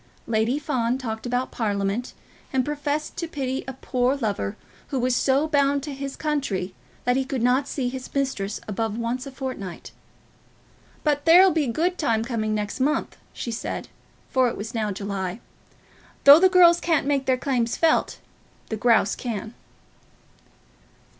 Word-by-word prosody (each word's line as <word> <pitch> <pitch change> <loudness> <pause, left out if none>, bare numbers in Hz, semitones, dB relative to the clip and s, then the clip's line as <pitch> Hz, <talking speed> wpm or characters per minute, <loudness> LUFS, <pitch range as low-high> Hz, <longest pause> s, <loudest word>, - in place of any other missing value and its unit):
Lady 225 +4 +1
Fawn 255 -5 0
talked 225 -2 -5
about 245 +1 -1
Parliament, 205 +1 -2 0.4
and 260 -2 +1
professed 295 +1 -2
to 335 - -3
pity 265 -4 -3
a 265 - -4
poor 255 0 0
lover 205 - -2 0.3
who 275 - -3
was 250 0 +1
so 275 +4 +2
bound 280 -2 +2
to 295 -1 -5
his 275 0 -5
country 270 -12 -2 0.3
that 245 0 +2
he 265 - +1
could 260 -2 -3
not 255 +3 +2
see 265 -3 -2
his 255 +1 -6
mistress 240 -7 -1
above 215 +1 -2
once 240 +3 -3
a - - -7
fortnight. 255 -9 -6 1.1
"But 290 -1 +1
there'll 360 +3 +8
be 305 -2 +1
a 240 - -1
good 355 +8 0
time 225 -7 +1
coming 215 -3 -1
next 210 +2 -3
month," 290 +4 0 0.2
she 235 - -5
said; 225 - -4 0.4
for 260 -1 +3
it - - -6
was 220 +3 -6
now 215 -3 -1
July. 195 0 -4 0.8
"Though 285 +2 +10
the 375 +1 +6
girls 345 -2 +6
can't 325 -5 +1
make 280 -1 0
their 260 -1 +3
claims 245 -3 -1
felt, 325 -1 +2 0.5
the 220 - -2
grouse 220 -3 +3
can." 220 -2 -5
255 Hz, 160 wpm, -24 LUFS, 225-285 Hz, 1.1 s, Though